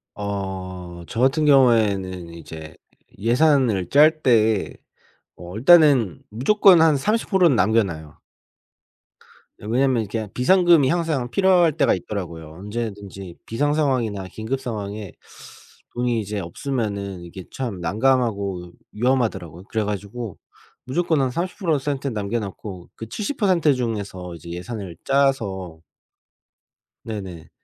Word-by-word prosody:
어 95 -3 -5
저 115 - -5
같은 135 +4 +3
경우에는 100 - +3
이제 80 -2 -10 0.4
예산을 120 - +2
짤 155 +2 +5
때 110 -4 +2 0.6
어 90 +2 -9
일단은 135 - +5
무조건 175 - +5
한 160 -2 +5
30%는 190 - +2
남겨 110 +4 +3
놔요. 80 -5 -8 1.4
예. - - -10
왜냐하면 125 +1 +2
이렇게 110 +1 -4
비상금이 170 0 +4
항상 155 -7 -1
필요할 180 -4 +4
때가 140 -5 +3
있더라고요. 85 -5 -6
언제든지 100 -4 -6
비상 145 +6 0
상황이나 120 -10 0
긴급 115 +5 -3
상황에 105 -4 -5 0.8
돈이 120 -2 0
이제 105 0 -4
없으면은 100 -1 -4
이게 90 +2 -9
참 115 -9 -4
난감하고 100 -3 0 0.2
위험하더라고요. 110 -8 -1
그래 110 -1 -1
가지고 105 +1 -5 0.5
무조건 160 +2 0
한 130 -1 0
삼십 180 - -4
프로 165 -6 +1
센트 140 0 -3
남겨 105 -1 -2
낳고 95 -3 -8
그 115 - -8
70% 185 - +1
중에서 100 -7 -4
이제 85 - -11
예산을 90 0 -6
짜서 100 -12 0 1.3
네네 95 -7 -7
110 Hz, 265 characters per minute, -22 LUFS, 95-135 Hz, 1.4 s, 짤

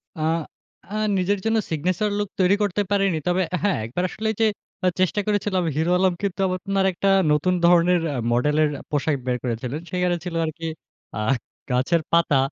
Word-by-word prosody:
আ - - -10 0.7
আ - - -4 0.2
নিজের 190 +2 +1
জন্য 225 0 +2
signature 180 +6 0
look 205 -1 -2
তৈরি 185 +1 +4
করতে 205 0 0
পারেনি। 195 -4 +2
তবে 180 +1 +2
অ্যা 180 - 0
হ্যাঁ, 205 -2 +2
একবার 130 +11 -3
আসলে 220 +4 -4
ওইযে 220 +1 +2 0.4
আ - - +5
চেষ্টা 185 +3 +2
করেছিলাম, 205 -3 +1
হিরো 160 +3 +1
আলম 185 0 +3
কিন্তু 195 -3 -2
আপনার 190 +1 -1
একটা 190 +2 0 0.2
নতুন 150 +5 +2
ধরনের 175 +1 +5
অ্যা 145 - -3 0.2
মডেলের 150 +5 +2 0.2
পোশাক 150 0 0
বের 125 -1 0
করেছিলেন। 125 +3 -3
সেখানে 180 -1 +1
ছিল 175 -2 -5
আরকি 165 +1 -6 0.5
আ - - -2 0.5
গাছের 130 +7 +2
পাতা। 170 -4 +4
180 Hz, 175 wpm, -23 LUFS, 155-195 Hz, 0.7 s, আ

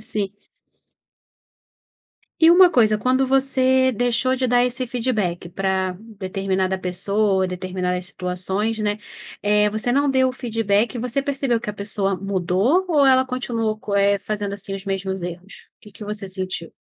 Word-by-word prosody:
Sim. 205 -2 -3 2.1
E 325 +1 +8
uma 360 0 +7
coisa, 215 -7 +4
quando 260 +4 +1
você 260 -1 +3
deixou 245 +2 +1
de 255 0 0
dar 245 0 +3
esse 250 +1 -2
feedback 220 -9 -2
para 190 0 -1
determinada 190 -3 -2
pessoa, 190 +1 0
determinadas 180 0 -3
situações, 190 +4 -3
né, 210 -1 0 0.5
eh, 210 0 +3
você 220 +3 -1
não 280 +3 +2
deu 260 -1 +3
o - - -3
feedback 225 -3 0
e 240 - -4
você 250 +3 -1
percebeu 270 -4 -1
que 215 - -7
a - - -1
pessoa 200 -1 -2
mudou, 195 - +1
ou 295 -4 +4
ela 260 -1 +5
continuou 230 -4 -2
co 210 -1 -7
eh, 200 0 +3
fazendo, 205 -1 -3
assim, 200 -1 -7
os 195 0 -6
mesmos 190 -1 -3
erros? 180 +3 -8
O - - -
que 210 - -15
que 205 +1 -10
você 205 -1 -5
sentiu? 185 -3 -5
210 Hz, 160 wpm, -22 LUFS, 190-250 Hz, 2.1 s, E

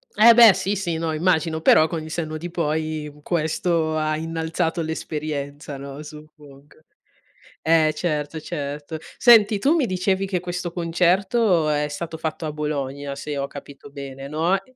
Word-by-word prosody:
Eh 230 +2 +8
beh 230 -4 +9
sì, 200 +3 -1
sì, 175 -4 -2
no 165 0 -2
immagino, 160 -1 +1
però 155 0 +6
con 160 -2 -4
il 155 - -9
senno 155 -2 -3
di 170 +2 -7
poi 155 -2 -2
questo 160 -1 0
ha 155 0 0
innalzato 165 +1 -2
l'esperienza, 150 -2 -5
no, 140 +2 -8
suppongo. 150 -2 -14 0.8
Eh 160 -1 +3
certo, 150 -1 -2
certo. 145 +2 -5 0.2
Senti 215 -4 +6
tu 285 +9 +3
mi 310 -6 +2
dicevi 190 +1 0
che 185 -2 -1
questo 175 0 -4
concerto 180 +1 +2
è 150 0 +1
stato 160 +2 -6
fatto 160 +1 -4
a 155 - -2
Bologna 140 -2 -4
se 145 0 -5
ho 140 - -2
capito 140 0 -11
bene, 135 -1 -8
no, 160 +6 +1
e 255 +5 -26
160 Hz, 160 wpm, -23 LUFS, 150-175 Hz, 0.8 s, beh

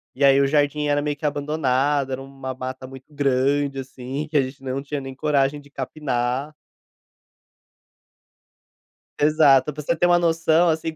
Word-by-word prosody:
e 140 - -2
aí 135 0 +6
o 135 - +3
jardim 150 0 +1
era 145 0 +2
meio 145 0 -2
que 150 - -8
abandonado, 145 -2 0
era 130 +1 -3
uma 135 -1 -7
mata 130 0 -6
muito 135 0 -12
grande, 140 0 +1
assim, 130 +3 -6
que 155 - -11
a 140 - +6
gente 135 +1 -7
não 130 +1 -3
tinha 145 0 -4
nem 135 -1 -7
coragem 145 0 0
de 145 - -19
capinar. 135 0 -3 2.7
Exato, 150 -2 +4
pra 150 +1 -7
você 170 +3 0
ter 175 - 0
uma 175 0 +4
noção, 165 0 +3
assim, 160 0 -1
140 Hz, 165 wpm, -22 LUFS, 135-150 Hz, 2.7 s, aí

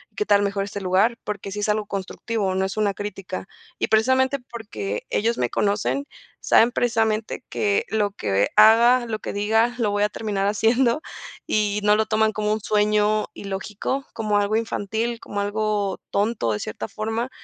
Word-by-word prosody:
¿qué 420 - -1
tal 205 - +4
mejor 200 0 -1
este 200 0 -5
lugar?", 195 +6 +2
porque 200 -1 -5
sí 205 - -4
es 205 - -1
algo 210 0 +1
constructivo, 195 0 -3
no 190 - +1
es 195 +2 -5
una 205 -2 +1
crítica 195 -2 -6 0.3
y - - 0
precisamente 260 +5 +3
porque 105 - -5
ellos 230 +2 0
me 120 -1 0
conocen, 210 +7 0 0.3
saben 235 +2 +4
precisamente 225 -1 0
que 200 -1 0
lo 210 -2 0
que 100 - 0
haga, 235 +3 +6
lo 220 -2 -3
que - - -5
diga, 220 +4 +2
lo 220 -4 0
voy 205 0 +1
a 210 - +2
terminar 200 -3 -2
haciendo 235 +6 +2 0.5
y 210 -1 +1
no 210 0 +5
lo 220 - +2
toman 220 0 +2
como 210 0 -1
un 215 - -3
sueño 210 0 +2
ilógico, 200 +7 -4
como 215 -2 0
algo 205 +1 +1
infantil, 225 +1 -2
como 205 -2 -4
algo 205 -1 -1
tonto 205 - 0
de 105 - -3
cierta 110 +1 -5
forma, 225 +3 -3
210 Hz, 175 wpm, -23 LUFS, 200-225 Hz, 0.5 s, haga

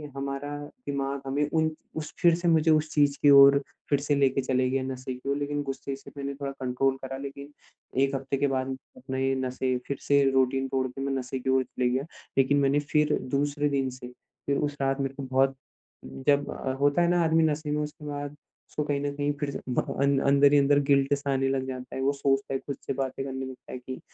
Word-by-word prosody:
हमारा 140 +1 -4 0.3
दिमाग़ 140 0 -2
हमें 145 +2 0
उन 160 -1 +3 0.3
उस 155 -1 -5
फिर 170 -2 +6
से 175 +1 -2
मुझे 160 -1 +4
उस 155 0 +2
चीज़ 145 -2 +3
की 145 - +6
ओर 140 0 +8 0.3
फिर 145 - +3
से 145 +1 0
लेके 135 -1 +2
चले 130 0 +1
गया 135 0 0
नशे 130 0 -5
की 125 +2 -7
ओर, 140 - +1
लेकिन 145 0 -2
गुस्से 135 0 -4
से 135 - -13
मैंने 140 0 -3
थोड़ा 140 0 -4
कंट्रोल 130 +1 0
करा। 135 0 -5
लेकिन 140 +1 -8 0.5
1 135 0 0
हफ़्ते 135 0 -2
के 140 +1 +2
बाद, 130 -1 -2 0.2
अपना 135 - -5
ये 135 0 +1
नशे 130 0 -1
फिर 140 - -2
से 140 0 +5
रूटीन 135 0 +2
तोड़ 130 0 0
के, 130 +2 -8
मैं 135 0 -1
नशे 130 0 -3
की 130 - -3
ओर 130 0 +3
चले 125 0 -1
गया। 130 +3 -1 0.3
लेकिन 135 +1 +4
मैंने 140 +1 +3
फिर 150 0 +3 0.2
दूसरे 145 +1 +1
दिन 135 -2 0
से, 125 -1 -9 0.4
फिर 140 0 +1
उस 145 0 -2
रात 135 0 +1
मेरे 135 0 -2
को 140 - -6
बहुत 135 +1 +2 0.7
जब 145 0 +3
अ, 130 - -3
होता 145 +4 +3
है 170 - +3
ना 175 -1 +3
आदमी 160 0 +3
नशे 155 -1 0
में 150 0 0
उसके 150 0 -8
बाद, 145 0 -5 0.3
उसको 150 - -2
कहीं 145 -1 -1
न 145 0 -1
कहीं 145 0 0
फिर 145 - -1
से - - -5
ब - - +2 0.2
अं 140 0 +3
अंदर 140 0 +6
ही - - +7
अंदर 140 +1 +4
गिल्ट 140 -1 +4
सा 140 0 -3
आने 135 0 +1
लग 135 -1 -1
जाता 130 -1 -6
है। 130 - -3
वो 135 +1 +3
सोचता 135 -1 0
है, 135 - 0
ख़ुद 140 0 -6
से - - -1
बातें 135 0 -3
करने 130 -1 -4
लगता 130 -1 -10
है, - - -5
कि 130 +1 -7
140 Hz, 235 wpm, -27 LUFS, 135-145 Hz, 0.7 s, ओर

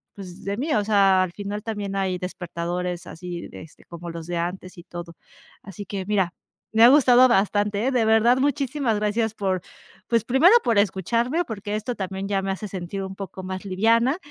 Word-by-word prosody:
pues, 185 -3 -10
de 200 +1 -2
mí, 295 +4 -1
o 210 - +2
sea, 195 -3 +4
al 185 - -4
final 205 +1 -5
también 205 -3 -4
hay 190 -2 -1
despertadores 175 0 -4
así 175 0 -7
de - - -10
este 160 - -18
como 170 0 -9
los 165 -1 -7
de 175 - -3
antes 180 +2 -4
y 175 - -10
todo. 175 -1 -8 0.5
Así 200 +1 -9
que 190 0 -5
mira, 190 -4 0 0.4
me 225 +1 +5
ha 240 - +10
gustado 255 -2 +6
bastante, 205 0 +1
eh, - - +1
de 245 -3 +3
verdad, 225 +2 +4
muchísimas 275 -4 0
gracias 215 +1 0
por, 190 -4 -1 0.5
pues, 230 -2 +1
primero 265 +10 +5
por 230 -3 +1
escucharme, 230 - +1
porque 205 -2 -5
esto 215 +3 -3
también 190 0 -4
ya 195 -1 0
me 195 0 -2
hace 195 +2 -5
sentir 190 0 -5
un 190 0 -7
poco 190 -1 -8
más 185 0 -5
liviana 230 - +2
200 Hz, 195 wpm, -24 LUFS, 185-225 Hz, 0.5 s, ha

